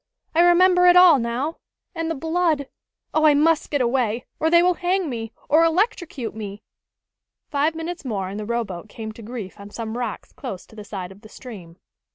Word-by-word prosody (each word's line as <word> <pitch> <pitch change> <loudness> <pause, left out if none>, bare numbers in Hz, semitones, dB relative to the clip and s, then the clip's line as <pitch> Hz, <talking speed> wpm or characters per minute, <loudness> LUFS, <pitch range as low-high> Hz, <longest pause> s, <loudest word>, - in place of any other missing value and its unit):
I 330 - +4
remember 360 +1 +5
it 355 - +7
all, 355 -6 +8
now. 245 +7 -2 0.4
And 330 -2 -3
the 325 - -1
blood! 320 -1 0 0.5
Oh, 310 0 +3
I 300 -1 +6
must 315 +2 +2
get 285 -2 0
away, 240 -2 0
or 320 - +2
they 340 +1 +6
will 360 0 +4
hang 355 -2 -1
me, 225 -2 -5 0.2
or 315 +3 +5
electrocute 330 - 0
me!" 205 -1 -7 0.9
Five 300 +3 +1
minutes 330 +2 -5
more 205 -7 -3
and 200 +3 -6
the 210 - -5
rowboat 215 -5 -3
came 220 0 -7
to 225 - -12
grief 220 -4 -7
on 200 0 -10
some 225 +1 -5
rocks 240 -4 -5
close 185 - -7
to - - -18
the 210 - -8
side 190 -3 -6
of 195 +1 -15
the 215 - -14
stream. 190 -10 -11
265 Hz, 200 wpm, -23 LUFS, 220-330 Hz, 0.9 s, all